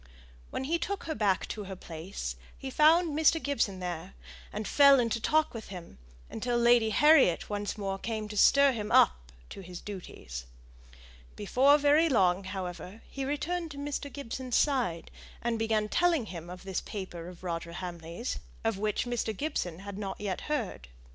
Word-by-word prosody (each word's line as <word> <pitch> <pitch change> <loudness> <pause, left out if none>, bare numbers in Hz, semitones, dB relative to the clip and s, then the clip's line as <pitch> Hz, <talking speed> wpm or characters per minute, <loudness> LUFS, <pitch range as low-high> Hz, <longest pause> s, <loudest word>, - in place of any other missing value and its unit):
When - - -3
he 330 +5 0
took 400 +3 -3
her 320 - -3
back 205 -6 +1
to 210 -2 -5
her 190 0 -6
place, 160 - -6 0.2
he 265 - -6
found 315 +2 +4
Mr. 320 +1 +4
Gibson 230 -10 -1
there, 180 0 -5 0.4
and 210 0 -4
fell 280 -2 +7
into 230 -1 0
talk 310 +5 +2
with 225 -2 -7
him, 175 - -10 0.3
until 240 - -2
Lady 235 -1 +5
Harriet 275 - +4
once 205 +1 -3
more 195 -2 -3
came 220 -1 -3
to 210 - -6
stir 280 +6 +6
him 215 -4 -4
up - - +4 0.2
to - - -8
his 180 -1 -8
duties. 65 - -8 0.9
Before 265 +8 +4
very 300 +3 +4
long, 190 -6 +3
however, 185 +2 -6
he 270 -1 -4
returned 330 +4 -2
to 290 - -9
Mr. 285 0 -4
Gibson's 255 -2 -4
side, 245 - +1 0.3
and 235 -1 -1
began 220 -1 +1
telling 335 0 +2
him 175 -4 -8
of 180 0 -9
this 190 -1 -3
paper 180 -4 -7
of 180 0 -11
Roger 170 -1 -4
Hamley's, 175 +4 -5 0.2
of 225 -3 0
which 210 +2 0
Mr. 235 -3 -2
Gibson 190 - -3
had 200 0 -6
not 195 -2 -5
yet 195 -3 -3
heard. 230 - -2
215 Hz, 170 wpm, -30 LUFS, 185-280 Hz, 0.9 s, fell